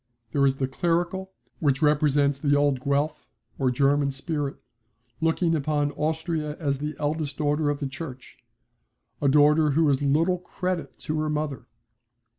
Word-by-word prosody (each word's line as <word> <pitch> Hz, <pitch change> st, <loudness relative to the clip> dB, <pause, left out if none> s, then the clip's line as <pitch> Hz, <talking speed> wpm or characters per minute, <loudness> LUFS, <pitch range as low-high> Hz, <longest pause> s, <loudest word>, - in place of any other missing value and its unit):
There 140 Hz, +1 st, +3 dB
is 135 Hz, -, +1 dB
the 135 Hz, -1 st, -1 dB
clerical, 175 Hz, +6 st, -1 dB, 0.3 s
which 145 Hz, -1 st, +1 dB
represents 145 Hz, -2 st, +3 dB
the 145 Hz, 0 st, +2 dB
old 145 Hz, -3 st, +2 dB
Guelph 140 Hz, +2 st, -1 dB, 0.3 s
or 135 Hz, -2 st, +2 dB
German 140 Hz, +2 st, +2 dB
spirit, 140 Hz, +1 st, -3 dB, 0.6 s
looking 165 Hz, +1 st, +1 dB
upon 145 Hz, -1 st, 0 dB
Austria 155 Hz, 0 st, -2 dB
as 140 Hz, -4 st, -1 dB
the 150 Hz, +1 st, -4 dB
eldest 150 Hz, -1 st, -2 dB
daughter 150 Hz, 0 st, +1 dB
of 145 Hz, -, 0 dB
the 140 Hz, -, -4 dB
Church 135 Hz, -2 st, -9 dB, 0.8 s
a 145 Hz, -, +2 dB
daughter 150 Hz, +2 st, +5 dB
who 160 Hz, -1 st, +4 dB
is 140 Hz, 0 st, +1 dB
little 165 Hz, +6 st, +2 dB
credit 180 Hz, -5 st, -4 dB
to 155 Hz, 0 st, -2 dB
her 155 Hz, 0 st, -1 dB
mother. 150 Hz, -4 st, -3 dB
150 Hz, 150 wpm, -25 LUFS, 140-160 Hz, 0.8 s, daughter